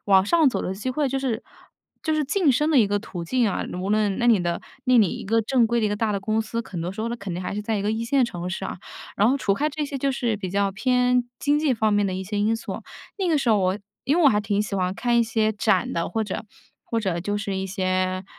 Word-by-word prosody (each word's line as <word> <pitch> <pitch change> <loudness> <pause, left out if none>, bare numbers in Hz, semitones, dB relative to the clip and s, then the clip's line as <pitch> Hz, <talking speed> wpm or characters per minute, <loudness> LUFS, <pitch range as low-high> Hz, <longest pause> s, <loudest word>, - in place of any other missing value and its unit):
往 190 -1 +5
上 320 +1 +4
走 - - -2
的 190 - -3
机 215 +6 -3
会 285 +1 0
就 270 - -2
是 255 -5 -2 0.6
就 315 - 0
是 305 -1 +1
晋 325 +1 +2
升 295 +5 +2
的 - - +4
一 210 - +4
个 205 0 +1
途 180 -4 -7
径 235 +6 +1
啊。 - - -2
无 185 +2 -3
论 210 -2 +1
那 240 - +1
你 220 -6 +5
的 170 0 -1 0.3
那 255 -1 +5
你 205 -5 +5
一 - - -6
个 225 +3 +2
正 245 +1 +3
规 235 0 +1
的 215 - +2
一 - - +1
个 205 - -1
大 215 +1 0
的 200 - 0
公 215 +3 0
司， 230 +1 -3
很 175 -4 -5
多 175 - -3
时 195 - -7
候 230 - -1
呢， 235 - -2
肯 200 -4 -6
定 175 - -4
还 185 - -4
是 210 - -3
在 220 0 -1
一 200 - -2
个 210 +2 0
一 225 +1 -2
线 260 +1 +3
城 180 -5 -5
市 190 +1 -4
啊。 - - -4 0.4
然 215 +4 +4
后 275 - +2
除 200 -7 +1
开 300 +7 0
这 300 +1 -3
些 280 - -5
就 275 +1 0
是 240 -5 -1
比 190 -3 -5
较 200 0 +1
偏 250 +3 +2 0.2
经 290 +1 +2
济 295 -4 +2
方 220 -2 +1
面 205 0 +3
的 190 - -1
一 190 +1 -4
些 205 +2 -4
因 220 +2 +2
素， - - -6 0.4
那 375 -2 0
个 315 - +3
时 260 - -1
候 215 - +5
我 185 +2 +1 0.2
因 290 +5 +1
为 350 - +3
我 - - +9
还 210 -3 +2
挺 205 -1 0
喜 210 -1 -3
欢 185 -1 0
看 240 +3 0
一 235 - +5
些 220 -1 +1
展 205 -3 +1
的， 170 0 -1
或 220 +5 -1
者 205 - -5 0.4
或 230 - -2
者 185 -5 -1
就 205 +3 -2
是 205 -2 -3
一 190 - -2
些， 185 -1 -1
215 Hz, 320 characters per minute, -24 LUFS, 195-250 Hz, 0.6 s, 我